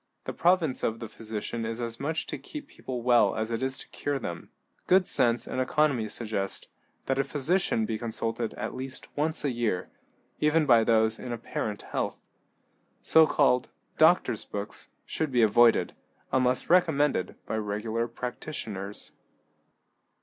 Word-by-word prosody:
The - - -5
province 170 -6 +2
of 115 0 -1
the 115 - -6
physician 110 +1 -5
is 115 +1 -3
as 115 -1 -4
much 155 +3 -2
to - - -5
keep 295 -2 -8
people 125 -2 -6
well 120 -5 +4
as 110 +1 -2
it 115 - -2
is 130 0 0
to - - -9
cure 145 -1 -2
them. 85 -9 -6 0.4
Good 185 0 +5
sense 120 -1 +2
and 130 - -2
economy 130 -5 +1
suggest 105 -3 -3 0.4
that 135 0 0
a - - +4
physician 145 - +1
be 110 -1 -3
consulted 115 0 -2
at - - -4
least 130 0 -8
once 155 +1 -1
a 140 - +1
year, 115 -7 -1 0.5
even 150 +1 +3
by 120 -5 +6
those 110 -1 +2
in 125 - -6
apparent 110 -2 -4
health. - - -3 0.9
So 160 -1 +6
called 135 -5 +3 0.3
"doctors' 160 -9 +4
books" 100 0 -6 0.2
should 155 -3 -2
be 120 -2 +4
avoided, 115 +2 +4 0.4
unless 130 -1 +2
recommended 150 - +2
by 110 - -2
regular 110 +2 -2
practitioners. 115 -5 -6
120 Hz, 150 wpm, -28 LUFS, 110-145 Hz, 0.9 s, by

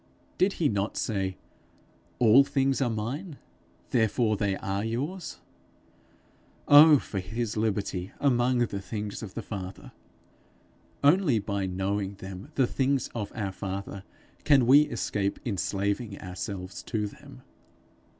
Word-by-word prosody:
Did 195 +2 +3
he 160 - +1
not 100 -2 -1
say, 95 -4 -2 0.8
'All 120 +3 +7
things 135 0 0
are 125 - +2
mine, 135 - -4 0.5
therefore 110 -1 +2
they 100 -1 0
are 100 +1 -3
yours'? 145 +11 -4 1.3
Oh 150 +1 +9
for 100 -6 -4
his 110 +4 -3
liberty 100 -3 -2
among 125 -2 +2
the 110 -5 -1
things 105 0 -5
of 100 -4 -8
the - - -4
Father! 95 -3 -7 1.1
Only 145 - +4
by 100 -2 -2
knowing 95 +2 -2
them 95 +7 -9
the 135 - +4
things 135 +1 0
of 105 -4 -4
our 100 -5 -2
Father, 100 0 -6 0.4
can 140 -4 +5
we 145 +4 +6
escape 100 -1 -2
enslaving 100 0 -2
ourselves 90 0 -6
to 110 -3 -2
them. 65 -10 -11
110 Hz, 125 wpm, -28 LUFS, 100-130 Hz, 1.3 s, Oh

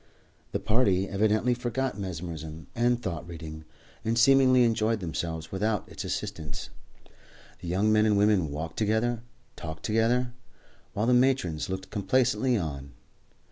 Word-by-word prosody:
The - - -1
party 100 -4 +2
evidently 110 +4 +2
forgot 125 +1 -2
mesmerism 80 -5 -6
and 120 +1 +2
thought 85 -8 -4
reading, 80 -2 -8 0.4
and 115 +1 0
seemingly 130 0 +6
enjoyed 115 -1 +2
themselves 80 -2 -4
without 105 +2 -1
its - - -7
assistance. 75 -5 -5 0.9
The - - -8
young 100 +5 +2
men 110 0 +4
and 105 -1 +3
women 100 -6 +3
walked 80 +3 -5
together 110 +2 +2
and 120 -1 -3 0.4
talked 80 -1 -7
together, 120 +3 +1 0.6
while 105 - 0
the 125 - +4
matrons 125 - +2
looked 95 0 -5
complacently 125 +4 +2
on. 70 - -5
105 Hz, 140 wpm, -28 LUFS, 85-120 Hz, 0.9 s, seemingly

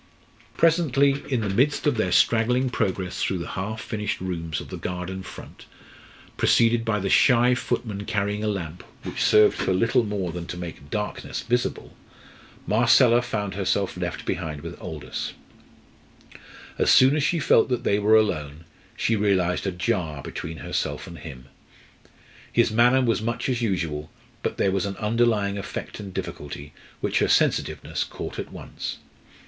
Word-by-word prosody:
Presently, 140 -4 +3
in 125 -3 +1
the 105 - -1
midst 130 +9 +1
of 150 - +3
their 110 - 0
straggling 125 +3 +3
progress 95 -6 -2
through 95 - 0
the 85 - -5
half 105 +4 -4
furnished 105 -2 -3
rooms 85 -3 -3
of - - -9
the - - -6
garden 90 +1 -4
front, 95 - -11 0.7
preceded 115 0 +3
by 110 -2 0
the 95 - -2
shy 125 +4 +5
footman 105 -4 -3
carrying 105 +1 -1
a - - 0
lamp, 90 -4 -4 0.2
which - - -5
served 105 0 +5
for - - -1
little 115 +5 +3
more 100 -5 -2
than 85 0 -6
to 90 - -6
make 85 -5 -8
darkness 105 +3 -3
visible, 125 +1 -2 0.7
Marcella 120 +2 +5
found 105 -5 -3
herself - - 0
left - - -4
behind 80 -4 -3
with - - -7
Aldous. - - -5 1.5
As - - +3
soon 130 +3 +6
as 155 - +1
she 170 +4 +1
felt 150 - +4
that 125 -1 -1
they 100 -3 +2
were 105 +2 +4
alone, 80 -7 0 0.3
she 115 - +1
realised 95 -3 +1
a - - 0
jar 90 -6 -2
between 80 0 -6
herself - - -2
and 85 - -10
him. 65 -6 -10 1.1
His 120 -1 +3
manner 120 +4 +4
was 115 -3 +1
much 115 +2 -2
as 125 -2 0
usual, 80 -8 -2 0.3
but - - -2
there 95 - +2
was 95 +1 0
an 95 - -5
underlying 105 -2 +1
effort 100 - -6
and 100 -2 -7
difficulty 75 -3 -6 0.3
which - - +1
her - - +2
sensitiveness - - +1
caught - - -7
at - - -6
once. - - -6
105 Hz, 160 wpm, -25 LUFS, 90-120 Hz, 1.5 s, soon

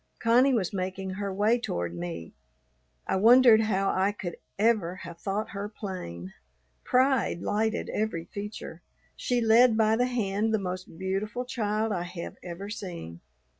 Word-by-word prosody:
Connie 250 +3 +4
was 195 -5 -1
making 190 0 -3
her 200 +1 -3
way 210 +5 +2
toward 85 - -3
me. 85 -1 -6 0.7
I - - 0
wondered 230 +2 +7
how 195 -3 +1
I 190 +2 +2
could 180 -4 -6 0.2
ever 205 -5 +2
have 170 -1 -9
thought 200 +4 -3
her 200 0 -4
plain. 95 - -7 0.5
Pride 255 -8 +2
lighted 220 +1 0
every 210 -6 -2
feature. 200 -5 -7 0.3
She 245 -1 0
led 225 +1 +5
by 220 0 +4
the 245 +2 +2
hand 220 -2 0
the - - +2
most 185 -3 -5
beautiful 200 +6 -2
child 220 -2 -1
I 180 -4 -1
have 175 -1 -7
ever 180 +3 -7
seen. 175 - -7
205 Hz, 150 wpm, -28 LUFS, 180-225 Hz, 0.7 s, wondered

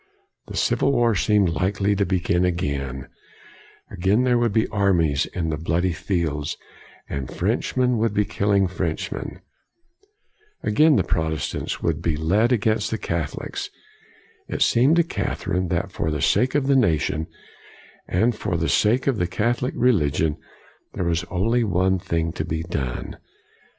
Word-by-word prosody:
The - - -6
civil 140 - +2
war 120 -3 +3
seemed 100 -1 +2
likely 100 +5 0
to 100 0 0
begin 90 -1 +1
again. 70 -7 -2 0.8
Again 100 +7 +2
there 125 -1 +3
would 120 -2 +1
be 110 +2 +2
armies 85 -8 +2
in 80 -3 -3
the 75 - -2
bloody 85 +3 0
fields, 80 -4 -2 0.5
and 70 -3 -4
Frenchmen 125 -2 0
would 115 +1 +1
be 105 0 +1
killing 100 -1 +1
Frenchmen. 85 -3 -4 1.2
Again 150 +8 +4
the - - +3
Protestants 80 -3 -2
would 85 -3 +1
1 - - -9
62 85 - +2
COLIGNY 80 +1 -4
be - - +4
led 120 +3 +3
against 110 -2 +1
the 110 - -2
Catholics. 85 -7 -4 0.8
It - - +1
seemed 130 +7 +4
to 170 - +4
Catherine 95 - -2
that 90 +3 -2
for 80 - -2
the 75 -1 -2
sake 125 - +2
of 145 -2 +2
the 140 0 +3
nation 80 - +1 0.8
and 110 +6 +1
for 90 -4 -2
the 80 0 -1
sake 115 +5 +2
of 135 -4 +1
the 90 - 0
Catholic 120 +7 -1
religion, 80 - +2 0.6
there 90 - -2
was 85 0 0
only 115 +8 +1
one 95 -2 +1
thing 85 -1 -2
to 80 - -3
be 80 +1 -3
done. 65 -7 -4
95 Hz, 155 wpm, -23 LUFS, 80-110 Hz, 1.2 s, Again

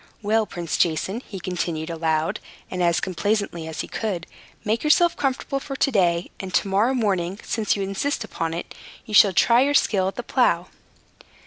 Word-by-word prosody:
Well, 215 +1 +2
Prince 170 -3 -3
Jason," 175 +7 0
he 195 - -7
continued, 170 -3 -3
aloud, 160 -1 0 0.3
and 185 - -2
as 170 -1 +3
complaisantly 190 -3 -1
as 160 - -4
he - - -7
could, 190 -6 -3 0.4
"make 220 +2 0
yourself 335 +3 +4
comfortable 275 0 -1
for 275 0 -6
to 275 - +1
day, 175 -5 +1
and 190 -1 -6
to - - +2
morrow 210 +7 +2
morning, 195 -5 0
since 220 -3 0
you 200 - -2
insist 195 +7 -2
upon 165 -6 -3
it, 170 - -6 0.3
you 215 - -9
shall 205 -1 +7
try 235 +7 +5
your 285 +2 +2
skill 190 -8 +3
at 195 - -3
the - - -5
plow." - - +1
195 Hz, 185 wpm, -23 LUFS, 170-225 Hz, 0.4 s, shall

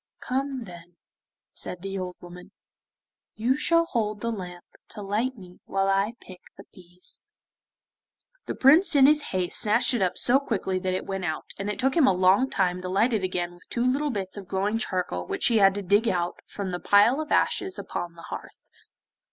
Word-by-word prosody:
'Come 265 0 -3
then,' 175 -3 -13 0.6
said 180 0 -6
the 195 0 -4
old 180 -1 -5
woman, 175 0 -12 0.9
'you 240 +4 +1
shall 335 +3 +3
hold 215 -7 -2
the 230 - -1
lamp 180 -4 -7 0.2
to 210 -2 -9
light 225 +6 -1
me 180 -3 -14
while 195 0 0
I 195 +3 +1
pick 185 -1 -13 0.2
the - - -11
peas.' 180 - -8 1.2
The - - -3
Prince 300 +6 +5
in 270 -2 +7
his 300 +1 +5
haste 180 -2 -1
snatched 215 +4 +3
it 240 - 0
up 185 -2 0
so 255 +3 +4
quickly 195 -8 -2
that 185 0 -1
it - - -4
went 195 -1 -4
out, 155 -2 -3
and 200 +1 -3
it 210 - -3
took 265 +1 +1
him 315 -6 +5
a - - +5
long 190 +8 +3
time 180 -4 0
to 185 - -5
light 220 +6 +2
it 210 -3 0
again 175 -1 -2
with 175 - -20
two 240 0 -1
little 280 +4 +1
bits 195 -5 -4
of 195 -2 -8
glowing 200 +4 -1
charcoal 180 - -2
which - - -2
he 230 -2 +4
had 195 -1 +5
to 205 - -4
dig 205 +5 +3
out 175 -3 -1
from 195 -2 -5
the 175 - -3
pile 210 +11 +4
of 310 - -7
ashes 380 -1 +1
upon 170 -1 -5
the 165 - -13
hearth. - - -9
195 Hz, 200 wpm, -26 LUFS, 180-240 Hz, 1.2 s, in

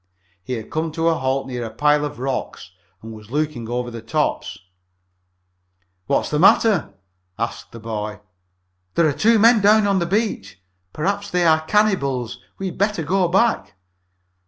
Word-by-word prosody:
He 125 - -5
had 115 -3 -6
come 160 +1 -2
to 165 +1 +1
a - - +3
halt 135 -2 -1
near 125 -2 -5
a 115 - -4
pile 150 +4 +2
of 145 0 -4
rocks 130 -8 -4 0.3
and 115 0 -8
was 110 -1 -13
looking 145 -4 -2
over 120 0 -3
the 115 -1 -7
tops. 150 +7 -2 1.5
"What's - - 0
the 150 - 0
matter?" 185 - +4 0.4
asked 115 +1 -4
the 115 - -10
boy. 105 -1 -5 0.8
"There 170 - +4
are 145 - +1
two 220 +11 +3
men 225 +1 +5
down 210 +2 +5
there 200 - +2
on 195 - +2
the 170 - -1
beach! 170 - -2 0.3
Perhaps 200 +6 -2
they 180 -1 +1
are 160 -1 +4
cannibals! 140 - +1 0.2
We 195 - -5
had 185 -2 -5
better 200 -4 0
go 185 +4 +1
back!" 195 - +1
150 Hz, 170 wpm, -21 LUFS, 120-195 Hz, 1.5 s, men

